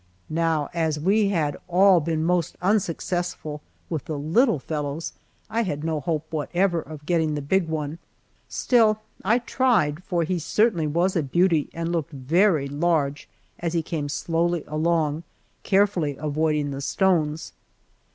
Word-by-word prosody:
Now 160 -2 +1
as 160 -3 0
we 200 +6 +3
had 155 -7 0
all 185 +1 +5
been 160 0 -1
most 175 0 0
unsuccessful 175 -5 -1 0.3
with 155 -5 -4
the 155 -3 -4
little 180 - +2
"fellows," 150 +2 -4 0.3
I 230 - 0
had 155 -9 -3
no 160 -1 -1
hope 155 +2 -2
whatever 170 +3 0
of 150 -1 -11
getting 160 -3 +1
the 145 - -3
big 180 +4 +1
one, 155 0 -3 0.5
still 220 -4 +3 0.2
I 220 +5 +3
tried, 225 - +1
for 175 -3 0
he 175 +2 -1
certainly 175 0 +1
was 170 +5 +1
a 165 - +2
beauty 165 +2 +2
and 165 0 -3
looked 165 -2 -2
very 155 +3 +2
large 145 -1 0 0.3
as 170 -1 -2
he 165 -2 0
came 155 -3 -3
slowly 165 +3 0
along, 155 0 0 0.4
carefully 190 -8 +1
avoiding 150 -1 0
the 135 0 -5
stones. 160 -2 0
165 Hz, 145 wpm, -24 LUFS, 150-180 Hz, 0.5 s, all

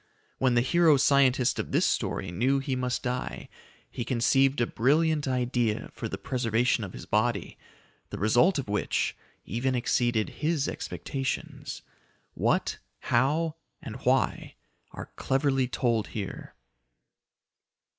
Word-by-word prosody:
When 130 -2 +2
the 120 - +4
hero 160 +3 +4
scientist 135 -2 +3
of - - -4
this - - +3
story 95 - -1
knew 125 +10 +1
he 135 -1 -2
must 125 -1 -2
die, 125 -1 -4 0.4
he 120 - -4
conceived 135 +3 +2
a 120 - +3
brilliant 150 +5 +2
idea 125 -3 -1
for - - -5
the - - -4
preservation 120 -1 0
of 95 - -7
his - - -9
body, - - -1 0.5
the - - -6
result 120 - +3
of 135 - -3
which 105 0 -1 0.3
even 130 +5 -1
exceeded 120 -2 +1
his 155 -3 +1
expectations. 135 -1 -4 0.5
What, - - 0 0.2
how, 155 +6 +1 0.2
and 115 -1 -8
why 130 +1 0 0.3
are - - -9
cleverly 135 -1 +1
told 120 -3 0
here. 100 -3 -6
125 Hz, 125 wpm, -28 LUFS, 120-135 Hz, 0.5 s, the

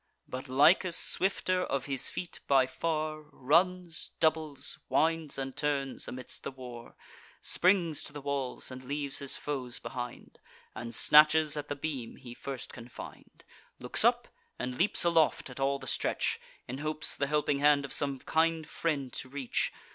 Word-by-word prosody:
But 130 +1 -6
Lycus, 170 +6 +5
swifter 185 -1 +1
of 135 -5 -1
his 135 -2 +1
feet 175 - -5
by 135 -2 +5
far, 155 +2 -2
Runs, 170 +5 +1
doubles, 155 -3 0
winds 160 +2 +1
and 135 -1 -4
turns, 140 -2 -1
amidst 125 -1 -7
the - - -4
war; 125 -3 -10 0.5
Springs 175 -4 +2
to - - -6
the 145 - -7
walls, 140 -2 -3
and 130 0 -8
leaves 140 +1 -2
his 140 -1 -2
foes 130 -4 -3
behind, 125 -1 -7 0.3
And 120 0 -6
snatches 155 0 +6
at 150 -1 -4
the 145 - -3
beam 140 -5 -4
he 120 -3 -10
first 135 +1 -6
can 115 -1 -9
find; 120 - -11 0.3
Looks - - -3
up, - - +4 0.3
and 125 0 -3
leaps 185 +8 +3
aloft 165 -5 +3
at 125 - -9
all 135 +1 +2
the - - -10
stretch, - - 0 0.3
In 130 +2 -5
hopes 155 +1 -1
the 140 - -1
helping 145 -1 +1
hand 145 -1 +5
of 140 - -3
some 140 -2 +1
kind 160 +2 +1
friend 145 -7 -2
to 130 - -5
reach. 135 -2 -1
140 Hz, 160 wpm, -31 LUFS, 130-155 Hz, 0.5 s, snatches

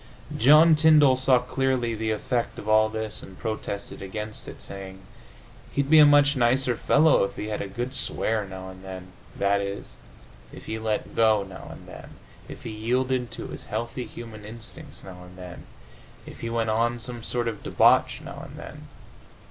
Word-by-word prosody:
John 150 +7 +7
Tyndall 150 -3 +6
saw 130 0 +4
clearly 125 -1 0
the 110 0 -2
effect 115 +3 -2
of 105 - -8
all 110 0 +4
this 110 -1 -5
and 95 - -12
protested 110 -3 -5
against 105 +2 -6
it, - - -9
saying, 95 -1 -8 0.7
"He'd 140 +1 0
be 160 - +9
a 150 - +9
much 145 0 +5
nicer 125 0 +2
fellow 150 +1 +4
if 100 - -3
he 105 - -5
had 105 - -3
a - - -4
good 120 +6 -4
swear 110 -4 -1
now 95 -1 -8
and 95 0 -12
then" 95 -1 -9 0.3
i. 100 0 +2
e., 100 0 -4 0.7
if - - -12
he 110 - -4
let 110 -1 -3
go 110 -2 +4
now 95 -1 -10
and - - -11
then, - - -11 0.3
if - - -10
he - - -5
yielded 125 +3 -1
to - - -7
his - - -7
healthy 120 +1 -4
human 115 -2 -10
instincts 115 +2 -10
now 90 -2 -10
and 90 0 -14
then, 90 -1 -10 0.6
if - - -11
he 115 - -4
went 115 -1 0
on 120 +2 +1
some 120 0 -6
sort 120 +1 -2
of 110 -3 -4
debauch - - +3
now - - -8
and - - -12
then. - - -10
110 Hz, 185 wpm, -25 LUFS, 100-125 Hz, 0.7 s, be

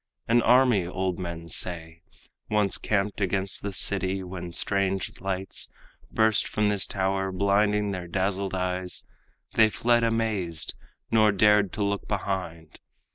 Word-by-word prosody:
An 120 +1 +4
army, 120 -7 +4
old 95 0 -2
men 85 -2 -5
say, 85 -1 0 0.5
Once 105 -2 +1
camped 105 0 -1
against 95 0 0
the 100 - -3
city, 95 0 0
when 90 -1 -7
strange 95 +1 -1
lights 95 0 -3 0.4
Burst 110 -1 +2
from 105 - 0
this 100 -2 0
tower, 95 0 -1
blinding 100 +2 +2
their 90 -2 -5
dazzled 95 +2 -1
eyes. 90 0 -2 0.5
They 110 -1 +5
fled 120 +2 +2
amazed, 110 -8 -1 0.4
nor 110 -1 +5
dared 105 -1 +4
to 110 - -1
look 100 0 -2
behind. 90 -6 -4
95 Hz, 130 wpm, -26 LUFS, 90-105 Hz, 0.5 s, They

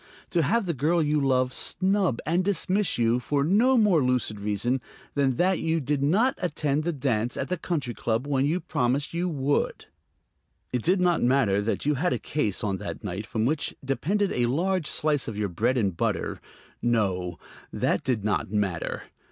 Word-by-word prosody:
To 170 - +2
have 205 +9 +1
the 170 - -1
girl 160 +4 +1
you 150 0 +1
love 130 -2 +1
snub 190 - +1
and 170 +4 +1
dismiss 195 +1 +1
you 115 +1 +2
for 140 +2 0
no 225 - +4
more 200 - +4
lucid 125 -4 0
reason 105 +5 -1 0.3
than 135 -3 +1
that 185 +5 +2
you 165 0 0
did 145 0 -1
not 205 - +3
attend 150 -4 -1
the 170 - 0
dance 125 -6 -1
at - - -3
the 180 - +1
Country 145 -9 -2
Club 115 +3 -1
when 135 -2 +1
you 155 +6 +1
promised 135 -1 -1
you 175 +2 -1
would! 145 -2 -1 0.9
It 125 - 0
did 180 +6 +2
not 175 -2 +2
matter 120 -6 +3
that 110 +5 -2
you 150 - +3
had 170 +6 0
a - - 0
case 110 -11 -2
on 100 -3 -1
that 85 -2 -7
night 100 +2 -5
from 110 -1 -1
which 145 +4 0
depended 195 +9 0
a 120 -1 +1
large 175 +5 0
slice 150 -3 +1
of 110 - -5
your 105 -2 -1
bread 115 +9 0
and 100 -7 0
butter; - - -2 0.4
no, 95 -7 0 0.3
that - - 0
did 120 -6 -1
not 105 - 0
matter. 100 -6 -2
140 Hz, 185 wpm, -26 LUFS, 115-170 Hz, 0.9 s, no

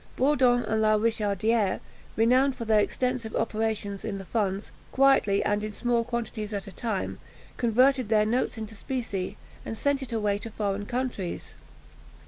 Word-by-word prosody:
Bourdon 255 -3 +3
and 220 0 0
La 215 0 +4
Richardière, 215 -1 +1 0.4
renowned 255 +4 +4
for 230 - -5
their 215 -1 +4
extensive 250 +1 -1
operations 215 -2 -1
in 215 -2 -3
the 195 - -8
funds, 200 -1 -1 0.2
quietly 265 -7 +4
and 205 0 0
in 215 0 -4
small 240 +1 +1
quantities 225 -3 -4
at 200 -1 -3
a 195 - -9
time, 215 +1 -3 0.4
converted 255 +1 +3
their 215 -1 +4
notes 240 +2 0
into 220 0 -6
specie, 205 -4 -4 0.3
and 225 - -5
sent 285 +2 +1
it 265 - -6
away 210 -3 0
to 230 - -6
foreign 205 -2 -2
countries. 245 -8 -3
220 Hz, 155 wpm, -27 LUFS, 205-245 Hz, 0.4 s, La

